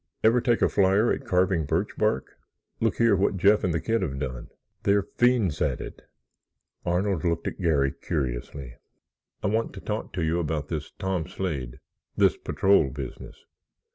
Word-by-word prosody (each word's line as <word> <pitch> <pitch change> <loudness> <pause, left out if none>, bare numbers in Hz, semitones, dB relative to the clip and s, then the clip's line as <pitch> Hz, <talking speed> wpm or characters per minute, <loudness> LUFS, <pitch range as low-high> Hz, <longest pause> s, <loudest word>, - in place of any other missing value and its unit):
Ever 115 +2 +5
take 120 -2 +2
a - - +6
flyer 100 +3 +3
at - - -5
carving 90 -3 +2
birchbark? 95 +1 -1 0.4
Look 115 -1 +1
here, 115 -3 +4
what 95 0 +1
Jeff 105 +3 +4
and 90 - +1
the 85 - 0
kid 115 +5 0
have 70 -7 -2
done. 65 -3 -5 0.3
They're 100 0 +3 0.2
fiends 120 -10 +3
at - - 0
it." - - -8 0.8
Arnold 90 0 0
looked 85 -1 0
at - - -5
Garry 70 -6 +2
curiously. 60 -1 -4 0.7
"I - - +1
want 110 +2 0
to - - -8
talk 105 +1 -4
to 90 - -2
you 80 +2 +1
about 75 -3 -2
this 75 -3 -4
Tom 95 -4 -2
Slade—this 70 -11 -2
patrol 95 -7 +3
business." 65 -1 -8
90 Hz, 160 wpm, -26 LUFS, 75-100 Hz, 0.8 s, a